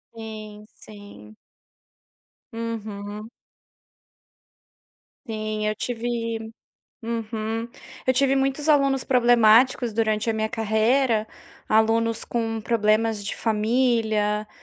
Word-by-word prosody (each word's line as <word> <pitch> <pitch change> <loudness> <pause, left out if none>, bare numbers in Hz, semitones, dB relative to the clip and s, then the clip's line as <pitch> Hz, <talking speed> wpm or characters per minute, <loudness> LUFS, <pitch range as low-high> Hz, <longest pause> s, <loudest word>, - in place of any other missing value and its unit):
Sim, 215 -1 -9
sim. 205 - -14 1.2
Uhum. 215 -2 -6 2.0
Sim, 215 -1 -3
eu 215 - -1
tive 230 -1 -3 0.5
Uhum, 225 0 -3 0.4
eu 260 - +3
tive 270 +1 +3
muitos 275 +2 0
alunos 275 -3 +3
problemáticos 240 -1 +4
durante 220 0 0
a - - +1
minha 220 0 -1
carreira, 220 +1 +1 0.4
alunos 225 +1 +2
com 225 -2 -2
problemas 220 -1 +1
de 200 - -4
família, 220 -2 +1
225 Hz, 85 wpm, -24 LUFS, 215-235 Hz, 2.0 s, problemáticos